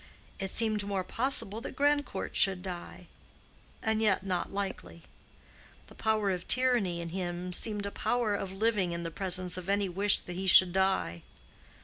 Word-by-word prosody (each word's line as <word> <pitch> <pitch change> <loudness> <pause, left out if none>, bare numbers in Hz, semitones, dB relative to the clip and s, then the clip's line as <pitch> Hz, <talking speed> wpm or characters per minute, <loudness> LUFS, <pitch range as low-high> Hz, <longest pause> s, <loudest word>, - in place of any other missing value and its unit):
It 195 0 -2
seemed 215 -1 +1
more 200 -2 -3
possible 225 -1 -1
that - - -8
Grandcourt 290 -7 -1
should 190 -2 +6
die:—and 200 +4 -7
yet 195 -3 +1
not 185 -2 -3
likely. 190 - -6 0.8
The - - -16
power 215 -2 0
of 180 -1 -5
tyranny 240 -9 +2
in 170 - -6
him 180 0 -5
seemed 210 +1 +1
a 200 - -4
power 235 -2 -1
of 195 -2 -4
living 195 -3 0
in 170 0 -5
the 165 - -5
presence 185 0 0
of 185 0 -7
any 200 0 +1
wish 200 +3 +1
that 175 - -8
he 190 +2 -4
should 180 0 +7
die. 190 - 0
195 Hz, 160 wpm, -29 LUFS, 180-215 Hz, 0.8 s, should